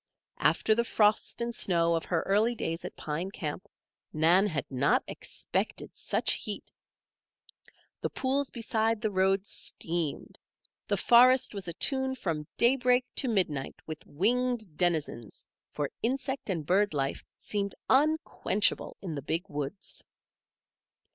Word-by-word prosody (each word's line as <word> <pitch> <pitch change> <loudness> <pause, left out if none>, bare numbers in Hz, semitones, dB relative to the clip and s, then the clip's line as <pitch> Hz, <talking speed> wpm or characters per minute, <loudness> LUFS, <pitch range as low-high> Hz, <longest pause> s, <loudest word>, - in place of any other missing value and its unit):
After 220 - +3
the 235 +2 +2
frost 215 0 +1
and 235 0 -2
snow 170 -5 +2
of 165 -1 -1
her 165 -3 0
early 215 +5 +2
days 165 -6 -3
at - - -7
Pine 165 +5 -4
Camp, 175 -3 -5 0.4
Nan 170 +6 +4
had 155 -8 -2
not 135 +2 +2
expected - - -3
such - - +1
heat. - - -5 1.3
The - - -1
pools 275 +1 -1
beside 225 -1 0
the 215 0 -1
road 190 +1 +2
steamed. 165 -6 -3 0.5
The - - +1
forest 250 +1 +5
was 200 -3 -3
atune 265 - +2
from 160 -9 -3
daybreak 250 0 +4
to 265 - +2
midnight 175 - 0
with 155 -1 -7
winged 220 +1 0
denizens, 155 - -1 0.2
for 145 -2 -3
insect 265 +1 -2
and 165 -6 -2
bird 195 +1 +2
life 135 -1 -2
seemed 200 -1 -3
unquenchable 285 -7 +1
in 175 -4 -4
the 140 - -4
Big 165 +7 -2
Woods. 145 +6 -5
195 Hz, 130 wpm, -29 LUFS, 160-235 Hz, 1.3 s, forest